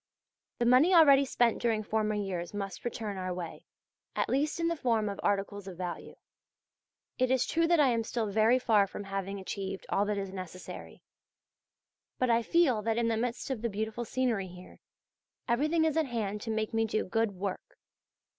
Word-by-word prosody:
The 240 - 0
money 265 +10 +5
already 280 -4 +7
spent 240 -3 +1
during 225 -2 +1
former 215 0 0
years 190 -3 -3
must 195 -2 -5
return 220 -4 -4
our 185 -1 -3
way, 175 -2 -6 0.5
at - - 0
least 295 +5 0
in 335 - +1
the 335 - 0
form 230 -7 +1
of 200 -1 -4
articles 200 0 -1
of 185 -3 -8
value. 180 -1 -6 1.0
It 255 0 +2
is 260 -1 +2
true 330 0 +1
that 340 -1 +4
I 285 -3 +5
am 230 -2 +1
still 225 0 -2
very 220 +4 +3
far 215 -5 +3
from 205 - -7
having 195 0 -4
achieved 195 0 -5
all 200 - +2
that 210 0 -1
is 195 -1 -4
necessary; 185 -1 -8 1.1
but 255 -2 +2
I 230 0 +4
feel 260 -4 +3
that 225 +1 -1
in 235 -1 +1
the 225 - +1
midst 245 +4 -2
of 245 -5 -3
the 235 - -1
beautiful 220 +3 -3
scenery 235 -5 -1
here, 180 0 -13 0.7
everything 305 +7 +2
is 315 -2 +1
at 320 -3 +2
hand 210 -4 -3
to 225 - -6
make 220 0 -1
me 225 0 +2
do 215 0 -1
good 225 +2 0
work. 190 0 -5
220 Hz, 190 wpm, -30 LUFS, 200-250 Hz, 1.1 s, already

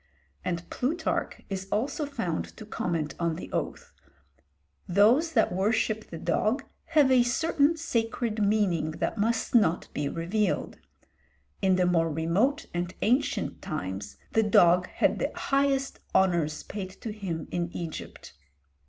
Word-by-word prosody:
and 170 -1 -3
Plutarch 320 +6 -1
is 190 -1 -4
also 275 +8 -1
found 205 - -3
to 215 - -9
comment 165 -7 -2
on 170 -2 0
the 175 - -8
oath, - - -4 0.9
"those 235 - +4
that - - +3
worship 215 +3 0
the 165 - -6
dog 215 - 0 0.2
have 295 -5 +4
a 255 -1 +6
certain 295 +5 +2
sacred 230 -6 -1
meaning 200 -6 +2
that 215 - -2
must 225 +2 0
not 190 -8 +3
be 145 -1 -1
revealed; 185 +6 -1 0.8
in 190 -1 +4
the 180 0 +3
more 165 -2 +2
remote 195 - +1
and 175 +1 -3
ancient 265 +6 +1
times 100 - -5
the 225 - +3
dog 180 -4 +5
had - - +1
the - - -1
highest 275 0 0 0.2
honours 170 -5 +2
paid 195 -2 -5
to 215 +4 -7
him 185 -7 -4
in 175 -1 -1
Egypt." 165 - -7
205 Hz, 135 wpm, -28 LUFS, 170-245 Hz, 0.9 s, a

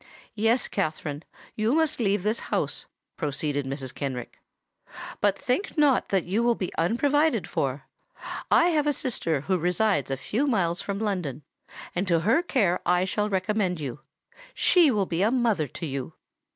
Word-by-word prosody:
"Yes, 225 +3 +2
Katherine: 155 -5 -2 0.3
you 220 +5 +1
must 320 -3 +2
leave 200 -4 +1
this 215 +2 0
house," - - -2 0.3
proceeded 145 -2 -2
Mrs. 135 -1 -5
Kenrick. 130 -4 -5 0.8
"But 205 -1 +2
think 340 +9 -2
not 290 -4 +3
that 190 -3 +2
you 200 +6 0
will 235 0 +3
be 185 - -4
unprovided 285 - +2
for. - - -2 0.7
I 345 - +5
have 300 -3 +1
a 295 - +3
sister 165 - -1
who 185 +4 0
resides 175 - +1
a 135 - -1
few 230 - -1
miles 175 -9 +1
from 200 -1 -3
London; 180 - -2 0.5
and 185 +3 -1
to 170 -2 +3
her 225 - +3
care 205 - +1
I 180 +1 +2
shall 210 +2 -1
recommend 190 -2 0
you. 140 -2 -5 0.6
She 345 -5 +5
will 210 -6 +1
be 170 0 -2
a 210 - +4
mother 230 - +1
to 165 - -7
you." 135 -3 -5
195 Hz, 165 wpm, -26 LUFS, 160-235 Hz, 0.8 s, I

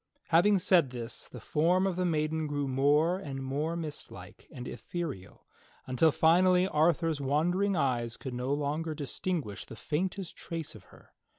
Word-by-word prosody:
Having 185 +5 +5
said 180 -6 +4
this 120 -1 -6
the 125 - -9
form 175 - +2
of 190 -2 0
the 180 0 0
maiden 155 -1 0
grew 145 -1 -2
more 145 +7 +3
and 135 -7 -6
more 145 +5 -2
mist 155 -3 -5
like - - -12
and 125 0 -7
ethereal 150 - -6 0.4
until 130 +5 +3
finally 180 +4 +4
Arthur's 165 -2 +2
wondering 175 +8 +1
eyes 120 -6 0
could 130 - -6
no 125 +2 -2
longer 150 +2 -1
distinguish 145 - -3
the - - -11
faintest 180 - -3
trace 160 -2 -6
of - - -14
her. - - -20
155 Hz, 160 wpm, -30 LUFS, 135-175 Hz, 0.4 s, Having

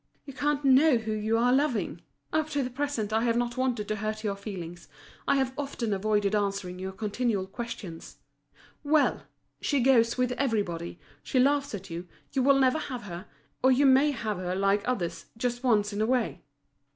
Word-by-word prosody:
You 275 - -9
can't 290 +1 -1
know 270 +1 +6
who 220 -1 -4
you 215 +1 0
are 245 +2 +3
loving! 270 -4 0 0.3
Up 310 0 +1
to 285 -2 0
the 250 - -4
present 250 -6 -2
I 220 - +3
have 230 0 +1
not 240 0 -1
wanted 250 -5 -1
to 215 - -2
hurt 215 +1 -3
your 205 -2 -1
feelings, 180 -4 -8 0.4
I 280 - +4
have 265 -1 +1
often 270 -6 -2
avoided 205 0 +1
answering 195 -3 -1
your 190 +1 -4
continual 210 0 -1
questions. 195 -5 -7 0.7
Well! 300 0 +2 0.3
she 285 - +1
goes 240 -2 +4
with 250 -1 +1
everybody, 200 -10 -2 0.2
she - - -2
laughs 280 -1 +2
at 195 -2 -9
you, 170 +2 -6 0.3
you 270 - +1
will 275 +1 +5
never 265 +3 +3
have 250 -5 -5
her, 175 -3 -8 0.3
or 260 - +5
you 270 +3 +4
may 270 +2 +6
have 220 -7 -2
her, 180 0 -3
like 195 +1 +2
others, 170 -9 -2
just 245 +1 -2
once 210 -4 +2
in 205 - -2
a 220 - +2
way." 250 -1 0
230 Hz, 190 wpm, -28 LUFS, 205-265 Hz, 0.7 s, know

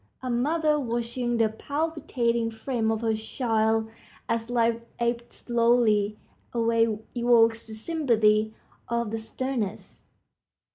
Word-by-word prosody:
A 255 - -2
mother 300 +5 +2
watching 240 -1 -2
the 225 -1 +4
palpitating 250 -3 -1
frame 225 0 -2
of 220 0 -1
her 225 -1 +1
child 220 0 0 0.4
as 230 0 -1
life 230 -1 +1 0.2
ebbs 235 0 -2
slowly 230 -3 +2 0.4
away 230 -2 +2 0.2
evokes 230 -1 +3
the 220 - -7
sympathy 220 -6 +2 0.3
of 235 -2 -1
the 225 - -2
sternest. 225 -2 -4
230 Hz, 110 wpm, -26 LUFS, 220-245 Hz, 0.4 s, the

